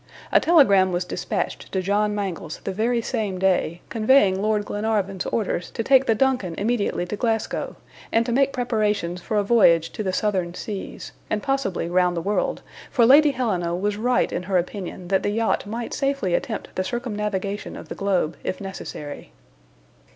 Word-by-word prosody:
A - - +6
telegram 200 - +5
was 175 0 -1
dispatched - - -3
to 190 - 0
John 205 +2 +1
Mangles 180 -6 -4
the 195 - -3
very 230 +3 0
same 215 -7 -2
day, 180 -2 +1
conveying 215 -4 +3
Lord 210 0 +1
Glenarvan's 205 -3 -1
orders 190 -6 -1
to 225 - -3
take 265 +2 +4
the 225 - +3
DUNCAN 250 -9 +1
immediately 205 -3 0
to 195 - -4
Glasgow, 225 0 -2 0.4
and 230 +1 +3
to 240 - -2
make 275 +3 +3
preparations 210 -8 -1
for 215 +2 -2
a 205 - +3
voyage 170 -7 +4
to 220 - -5
the 190 -3 -1
Southern 185 -3 -1
Seas, 200 +1 -6 0.2
and 210 -1 -1
possibly 270 -11 -1
round 180 0 +2
the - - -1
world, 205 +5 -1 0.3
for 240 -4 +4
Lady 290 +5 +7
Helena 185 -11 -1
was 205 +3 -1
right 245 +4 +1
in - - -1
her 185 +1 0
opinion 180 0 -4
that 190 -1 +2
the - - -1
yacht 220 -1 0
might 230 +2 -4
safely 275 -10 0
attempt - - -3
the 185 - 0
circumnavigation 210 -4 -3
of - - -10
the - - -5
globe, 190 -5 0
if - - -3
necessary. 150 - -7
205 Hz, 175 wpm, -23 LUFS, 185-230 Hz, 0.4 s, Lady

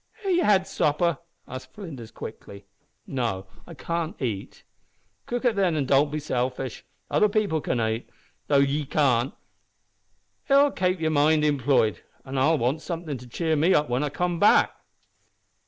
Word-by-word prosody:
"Have 390 - 0
ye 355 - +3
had 200 - +3
supper?" 155 0 +1 0.3
asked 130 +1 -9
Flinders, 145 - -8
quickly. 100 -3 -10 0.4
"No 115 -8 -2 0.2
I 170 - -10
cannot 165 +3 -3
eat." 110 -7 -4 0.6
"Cook 245 +1 -3
it 235 -3 +3
then, 185 -5 +2
an' 145 -3 0
don't 140 +2 +3
be 150 - -2
selfish. 130 -3 -3 0.3
Other 210 - +4
people 200 -7 0
can 125 - -1
ait, 110 +1 -2 0.4
though 140 - +3
ye 140 +2 +2
can't. 130 -3 +2 1.2
It'll 280 +1 +5
kape 185 -4 0
yer 160 -1 0
mind 150 +1 +3
employed 130 - +2 0.2
an 135 0 -3
I'll 155 +5 +3
want 135 +5 0
somethin' 165 -6 -5
to 125 - -12
cheer 160 +6 -1
me 165 +5 +3
up 150 -2 +2
whin 125 +3 +1
I 150 - -1
come 175 +2 -2
back." 205 - +5
150 Hz, 160 wpm, -25 LUFS, 130-170 Hz, 1.2 s, It'll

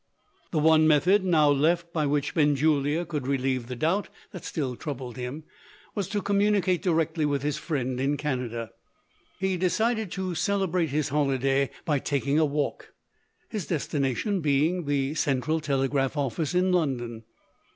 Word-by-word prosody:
The 165 - -2
one 155 0 +5
method 180 +6 +4
now 155 -5 +4
left, 170 +4 +1
by 155 -3 +1
which 145 0 0
Benjulia 150 +1 +2
could 150 -6 -4
relieve 130 -3 0
the 125 - -5
doubt 165 - 0 0.2
that 180 -5 -9
still 135 -6 -3
troubled 130 -4 -6
him, 130 +5 -5 0.5
was 200 -3 -2
to 205 -3 -2
communicate 200 -3 +2
directly 165 -3 +1
with 145 -2 0
his 145 -1 -1
friend 130 -5 -2
in 140 +2 +1
Canada. 125 -6 -3 0.7
He 190 -1 0
decided 220 +4 +1
to 190 -2 -3
celebrate 185 -3 0
his 150 +1 -1
holiday 135 -1 +1 0.2
by 150 -5 +1
taking 140 +2 0
a 160 - +4
walk; 145 0 -3 0.6
his 210 -7 -4
destination 155 - -1
being 155 +4 +1
the 140 0 0
central 150 +1 0
telegraph 135 -1 0
office 145 +4 -1
in 185 +1 +3
London. 120 -9 -1
150 Hz, 150 wpm, -27 LUFS, 135-175 Hz, 0.7 s, one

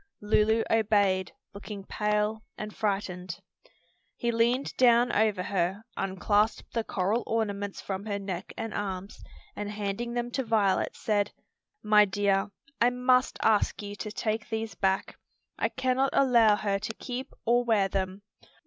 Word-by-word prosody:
Lulu 215 +2 +3
obeyed, 200 -4 +2 0.2
looking 200 0 -8
pale 210 +2 0 0.2
and 215 0 -6
frightened. 185 -4 -2 0.8
He 235 - -1
leaned 235 +4 +1
down 240 -1 +5
over 210 -3 +2
her, 190 +2 -1
unclasped 205 +3 0
the 230 - 0
coral 205 +4 0
ornaments 205 -3 -2
from 195 +2 -5
her 200 -1 -1
neck 190 -2 -5
and 225 -1 -4
arms, 195 -1 -4 0.3
and 205 0 -4
handing 210 +3 -3
them 240 0 -2
to 265 - -1
Violet, 215 -4 +1
said, 205 -2 0 0.5
"My 210 -1 +6
dear, 195 0 +1 0.3
I 240 - +6
must 250 +1 +2
ask 215 -1 +2
you 205 0 -6
to 215 - -5
take 215 0 -2
these 220 0 -3
back. 190 0 -1 0.4
I - - +1
cannot 260 +1 +1
allow 235 -6 +5
her 200 -1 -1
to 215 +2 -4
keep 255 0 -6
or 240 +1 +3
wear 220 -5 +3
them." 190 +1 -3
210 Hz, 145 wpm, -28 LUFS, 200-230 Hz, 0.8 s, My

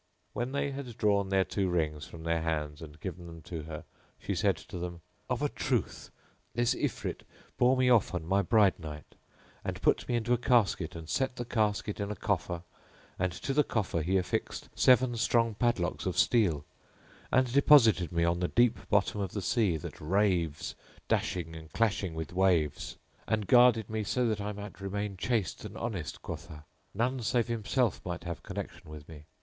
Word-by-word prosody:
When 120 +2 -2
they 140 0 -1
had 135 -4 -7
drawn 100 -2 +2
their 95 -1 +3
two 95 0 -1
rings 75 -4 -1
from 80 -1 -10
their 85 0 0
hands 75 -2 -2
and 80 -1 -10
given 90 0 -6
them 85 -1 -11
to 85 -3 -6
her, 80 -1 -7 0.3
she - - -3
said - - +2
to 90 - -8
them, 85 -1 -5 0.3
"Of - - -1
a - - +2
truth - - -2 0.5
this 120 0 +2
Ifrit - - -3 0.4
bore 125 +2 +5
me 130 0 +3
off 120 -7 +4
on 80 -2 -3
my 95 +4 +2
bride 100 -1 +4
night, 75 -2 -9 0.5
and - - -4
put - - +2
me 120 - +1
into 120 +1 +1
a 120 - +2
casket 105 -10 +2
and 80 -1 -8
set 130 - 0
the 120 - -4
casket 105 -2 0
in 100 0 -2
a 105 - -3
coffer 90 -3 -2 0.6
and 90 0 +1
to 95 +9 -3
the 150 +2 +4
coffer 100 - -1
he 95 +5 +1
affixed 90 - -2
seven 125 -1 +4
strong 115 -1 +2
padlocks 105 -6 0
of - - -2
steel 85 -11 +3 0.7
and 130 -2 +3
deposited 115 - +6
me 85 -1 +1
on 85 +1 +2
the 90 - +1
deep 120 -1 +3
bottom 105 0 +2
of 95 -2 -3
the 105 - -2
sea 100 -6 +2
that 75 - -8
raves, 85 -2 +1 0.4
dashing 80 -3 -1
and 80 -1 -10
clashing 100 -6 0
with 80 0 -5
waves; 90 -5 +1 0.3
and 110 -2 0
guarded 120 -2 +5
me 110 0 -2
so 125 +4 +1
that 110 -2 -1
I 105 +1 -2
might 105 -1 -8
remain 100 +1 -3
chaste 105 -2 -1
and - - -8
honest, 100 -10 -4
quotha! 75 -1 -7
that - - -31 0.3
none 125 +3 0
save 120 0 +1
himself 115 0 0
might 85 -1 -5
have 85 -1 -5
connexion - - -7
with 75 -1 -10
me. 75 -2 -12
100 Hz, 190 wpm, -30 LUFS, 85-115 Hz, 0.7 s, deposited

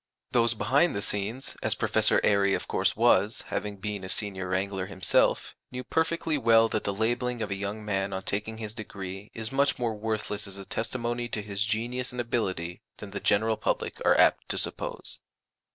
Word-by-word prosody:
Those 115 -1 +3
behind 135 +11 +3
the 100 - -1
scenes, 105 +6 -2
as - - +2
Professor - - +3
Airy 100 -1 +4
of - - -5
course - - +1
was, 110 -2 +3
having 105 -1 -3
been 100 0 -4
a 95 - -6
Senior 95 -2 -2
Wrangler 95 0 -1
himself, 95 -2 +2 0.2
knew 125 0 -4
perfectly 160 +1 0
well 115 -2 +6
that 110 - -2
the 100 - +1
labelling 120 +3 0
of 105 - -4
a - - 0
young 100 +2 -4
man 95 -1 0
on 95 0 -3
taking 105 +3 -2
his 110 -1 -5
degree 100 -2 -7
is 110 0 -4
much 140 +1 +2
more 120 -2 0
worthless 105 -1 -3
as 100 0 -9
a 100 - -8
testimony 120 +2 -2
to 105 -3 -3
his 100 0 -1
genius 120 +4 -1
and 125 - -6
ability 95 -8 -2 0.2
than 100 -2 -9
the 100 - -4
general 110 +2 +2
public - - -2
are - - +5
apt - - +4
to - - -1
suppose. - - -2
105 Hz, 190 wpm, -28 LUFS, 100-120 Hz, 0.2 s, well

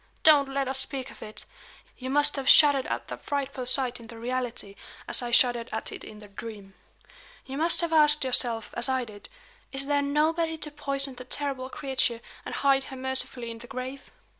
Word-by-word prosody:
Don't 290 -3 +6
let 275 0 -1
us 265 0 +3
speak 270 -1 -2
of - - -16
it! 215 - -3 0.5
You 260 0 -6
must 290 +2 +3
have 270 -2 0
shuddered 285 -3 +7
at - - -3
that - - -7
frightful 275 -3 -3
sight 255 -1 +1
in 230 - -12
the 230 0 -10
reality, 240 -3 -3 0.3
as - - +3
I 240 - -3
shuddered 240 0 +3
at 220 - -4
it - - -8
in 215 - -10
the 210 0 -12
dream. 200 -1 -9 0.7
You 270 +2 -6
must 335 +2 +3
have 335 -1 -1
asked 300 -1 +6
yourself, 240 -4 +1
as 240 - +4
I 260 -1 0
did: 205 -2 -13 0.4
'Is 270 0 -1
there 285 0 +1
nobody 320 +3 +1
to 300 -1 -7
poison 275 -1 -2
the 250 - -9
terrible 265 0 -3
creature, 260 -4 -1 0.3
and - - -5
hide 270 -1 +2
her 265 - -9
mercifully 260 -2 -3
in 230 - -9
the 240 - -11
grave?'" 260 +1 -7
265 Hz, 200 wpm, -27 LUFS, 240-280 Hz, 0.7 s, shuddered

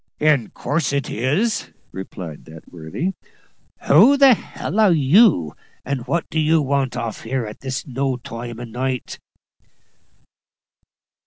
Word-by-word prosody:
"In 150 -7 +2
course 145 -1 -2
it 140 -1 -2
is," 150 - -1 0.2
replied 90 -4 -8
that 80 +1 -14
worthy. 85 - -4 0.7
"Who 220 - +6
the 275 -1 +7
h 235 - +4 0.2
l 215 - -2
are 210 -4 +5
you, 150 - +4 0.3
and 135 -2 -3
what 170 0 -1
do 160 - 0
you 160 +1 +3
want 135 -3 -1
off 115 -3 -4
here 125 +1 -3
at 105 0 -9
this 130 0 -4
no 135 -1 -2
time 120 -1 -8
o' - - -6
night?" 125 +2 -4
135 Hz, 140 wpm, -21 LUFS, 115-160 Hz, 0.7 s, the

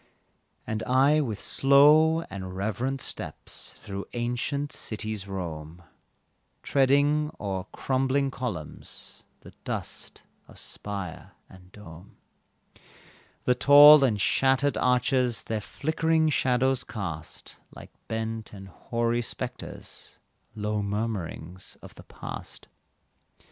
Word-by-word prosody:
And 110 0 -3
I 135 +6 +4
with 110 -8 -3
slow 150 +4 +5
and 95 - -7
reverent 120 +7 -2
steps - - -7
Through 100 -1 -6
ancient 125 +4 -2
cities 110 -4 -4
roam, 85 -3 -6 0.8
Treading 145 +2 +3
o'er 95 -3 -3
crumbling 135 +1 0
columns, 105 - -7 0.2
The - - -13
dust - - -5 0.2
of - - -15
spire 100 -5 -6
and 90 0 -17
dome; 90 -2 -13 1.3
The 125 - +3
tall 145 +3 +9
and 110 -6 +2
shattered 135 +6 +2
arches 125 -1 +1
Their 110 -1 -3
flickering 160 +5 +1
shadows 130 -1 +2
cast, 85 -7 -7
Like - - -13 0.2
bent 110 -1 -4
and 95 -1 -10
hoary 115 +5 -1
spectres, 125 +1 -7 0.4
Low 105 0 -1
murmuring 100 -5 -3 0.3
of - - -11
the - - -14
past. - - -9
120 Hz, 100 wpm, -27 LUFS, 100-135 Hz, 1.3 s, tall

